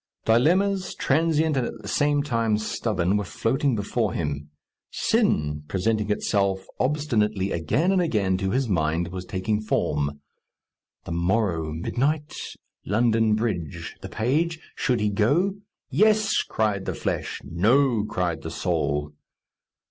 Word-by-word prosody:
Dilemmas, 185 - +2
transient 160 +1 +2
and 125 -3 +1
at 115 - -8
the - - -10
same 145 -1 +2
time 115 -6 +1
stubborn, 105 -3 0
were 105 - -1
floating 130 - 0
before 105 0 -1
him. 75 -2 -3 0.4
Sin, 75 0 +1
presenting 105 +4 0
itself 100 -2 0
obstinately 110 -9 +1
again 140 - +1
and 190 -2 +3
again 105 - +1
to 95 0 -1
his 130 +5 0
mind, 85 -2 0
was 90 0 -6
taking 105 +4 -1
form. 75 -8 -1 0.9
The - - -6
morrow, 85 -2 0
midnight? 140 - -1 0.5
London 110 +1 +2
Bridge, 100 -9 -3
the - - -7
page? 160 +8 0
Should 125 -6 0
he 105 -1 +1
go? 155 - +2 0.3
"Yes," 215 0 +3
cried 105 -3 -1
the - - -3
flesh; - - -3
"No," 115 - +2
cried 90 -5 -2
the - - -5
soul. 75 +1 -1
110 Hz, 130 wpm, -25 LUFS, 95-140 Hz, 0.9 s, and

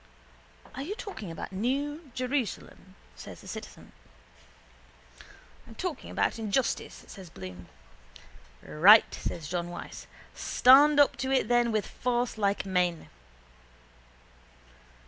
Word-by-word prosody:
—Are 265 - -6
you 360 +9 -4
talking 385 - -8
about 165 - -7
the 190 - -7
new 285 - -2
Jerusalem? 255 - -4 0.2
says - - -11
the - - -14
citizen. - - -9 1.8
—I'm 225 - -13
talking 345 -3 -5
about - - -1
injustice, 225 +4 -2
says 190 -4 -11
Bloom. 90 - -10 1.0
—Right, 200 +8 +6
says 160 -3 -5
John 175 +1 -3
Wyse. 175 - -9 0.3
Stand 285 +4 +5
up 285 - +4
to 265 +2 -2
it 260 -4 +1
then 240 -1 +3
with 215 -2 0
force 245 -2 -2
like 200 -1 0
men. 180 -3 -1
230 Hz, 115 wpm, -28 LUFS, 185-270 Hz, 1.8 s, Right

